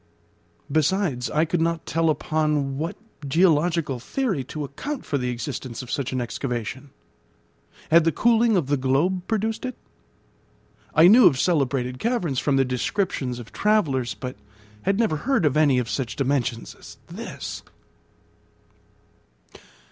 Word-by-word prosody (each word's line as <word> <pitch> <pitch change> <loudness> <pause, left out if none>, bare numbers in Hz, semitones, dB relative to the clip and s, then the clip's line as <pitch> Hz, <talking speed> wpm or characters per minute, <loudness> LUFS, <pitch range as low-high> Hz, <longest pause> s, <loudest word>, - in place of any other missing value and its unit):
Besides 155 -4 +1
I 155 +2 +2
could 165 0 -1
not 165 0 -1
tell 165 0 +1
upon 150 -3 0
what 165 +2 -3 0.3
geological 160 -3 +2
theory 195 - -2
to 150 +3 -5
account 255 - -5
for 145 -3 -1
the 125 0 -2
existence 120 +1 -5
of 125 - -9
such 140 -4 -2
an 130 - -1
excavation. 125 +2 -4 1.0
Had 165 +1 +7
the 165 - +2
cooling 230 +3 +3
of 170 - +1
the 145 +1 +1
globe 140 +8 +1
produced 220 0 -1
it? 255 -1 -5 1.2
I 160 +3 +8
knew 220 +1 +8
of 140 -7 +3
celebrated 130 -7 0
caverns 215 - 0
from 145 - +1
the 135 0 +3
descriptions 130 - -2
of 120 -2 -10
travellers, 140 - +1
but 125 +5 -7 0.4
had 195 +1 +1
never 215 -9 +1
heard 235 - +1
of 145 -2 +2
any 150 -4 +4
of 125 -2 0
such 125 -1 -3
dimensions 130 -4 -1
as - - -14
this. - - -7
150 Hz, 140 wpm, -24 LUFS, 130-180 Hz, 1.2 s, I